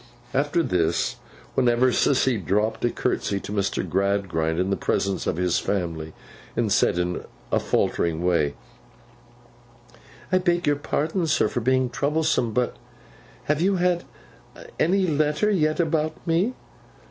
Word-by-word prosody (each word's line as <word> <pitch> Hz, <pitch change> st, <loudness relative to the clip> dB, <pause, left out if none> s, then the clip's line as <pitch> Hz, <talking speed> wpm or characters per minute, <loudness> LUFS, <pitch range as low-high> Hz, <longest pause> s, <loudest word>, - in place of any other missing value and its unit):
After 145 Hz, +5 st, +1 dB
this, 80 Hz, -, 0 dB, 0.4 s
whenever 125 Hz, +1 st, +3 dB
Sissy 125 Hz, -5 st, +2 dB
dropped 105 Hz, +6 st, 0 dB
a 120 Hz, -, +3 dB
curtsey 100 Hz, -3 st, -1 dB
to -, -, -7 dB
Mr. 100 Hz, -2 st, -1 dB
Gradgrind 95 Hz, -4 st, 0 dB
in 95 Hz, +2 st, 0 dB
the -, -, +2 dB
presence 95 Hz, -1 st, -1 dB
of -, -, -1 dB
his 90 Hz, -1 st, +1 dB
family, 80 Hz, -5 st, -3 dB, 0.4 s
and 115 Hz, -3 st, 0 dB
said 100 Hz, -, +3 dB
in 90 Hz, 0 st, -1 dB, 0.3 s
a -, -, +3 dB
faltering 85 Hz, 0 st, 0 dB
way, 75 Hz, -5 st, +2 dB, 1.8 s
'I 185 Hz, -, +4 dB
beg 175 Hz, -1 st, +1 dB
your 145 Hz, -1 st, +2 dB
pardon, 160 Hz, +4 st, -1 dB
sir, 155 Hz, -, +2 dB
for -, -, -2 dB
being 130 Hz, +1 st, +1 dB
troublesome—but—have 130 Hz, -, -2 dB
you 195 Hz, +2 st, +3 dB
had 180 Hz, -1 st, +1 dB, 0.8 s
any 190 Hz, +3 st, +3 dB
letter 155 Hz, +5 st, +1 dB
yet 155 Hz, -5 st, +1 dB
about 155 Hz, -1 st, +1 dB
me? 180 Hz, +9 st, +1 dB
125 Hz, 130 wpm, -24 LUFS, -, 1.8 s, I